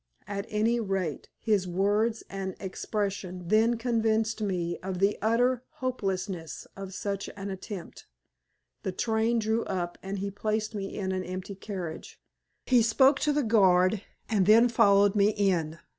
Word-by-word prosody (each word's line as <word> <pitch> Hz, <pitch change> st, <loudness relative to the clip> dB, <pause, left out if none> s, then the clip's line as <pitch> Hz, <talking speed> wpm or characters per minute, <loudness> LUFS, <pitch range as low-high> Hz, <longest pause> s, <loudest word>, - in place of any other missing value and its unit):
At 200 Hz, +1 st, -4 dB
any 225 Hz, +3 st, +1 dB
rate, 190 Hz, -8 st, -2 dB
his 205 Hz, -4 st, +1 dB
words 205 Hz, +5 st, +1 dB
and 195 Hz, -1 st, -5 dB
expression 190 Hz, -2 st, -4 dB
then 225 Hz, +3 st, +4 dB
convinced 225 Hz, -2 st, 0 dB
me 175 Hz, -4 st, -1 dB
of 185 Hz, 0 st, -4 dB
the 200 Hz, +3 st, +2 dB
utter 245 Hz, +3 st, +2 dB
hopelessness 190 Hz, -, -3 dB
of 195 Hz, -1 st, -7 dB
such 200 Hz, -1 st, -3 dB
an 195 Hz, 0 st, -5 dB
attempt. 190 Hz, -1 st, -8 dB, 0.7 s
The 190 Hz, -, -3 dB
train 225 Hz, +3 st, +1 dB
drew 220 Hz, +1 st, +1 dB
up, 175 Hz, -2 st, -3 dB
and 195 Hz, +1 st, -4 dB
he 200 Hz, +1 st, -3 dB
placed 215 Hz, +2 st, -2 dB
me 195 Hz, -2 st, -5 dB
in 190 Hz, -2 st, -2 dB
an 185 Hz, 0 st, -2 dB
empty 185 Hz, +2 st, -6 dB
carriage. 185 Hz, -5 st, -7 dB, 0.5 s
He 250 Hz, -2 st, +5 dB
spoke 265 Hz, +5 st, +4 dB
to 300 Hz, -, +2 dB
the 295 Hz, 0 st, +1 dB
guard 190 Hz, -3 st, +4 dB, 0.3 s
and 200 Hz, -4 st, +1 dB
then 230 Hz, +3 st, +7 dB
followed 200 Hz, -3 st, +5 dB
me 210 Hz, 0 st, +3 dB
in. 170 Hz, -6 st, +1 dB
200 Hz, 150 wpm, -28 LUFS, 190-220 Hz, 0.7 s, then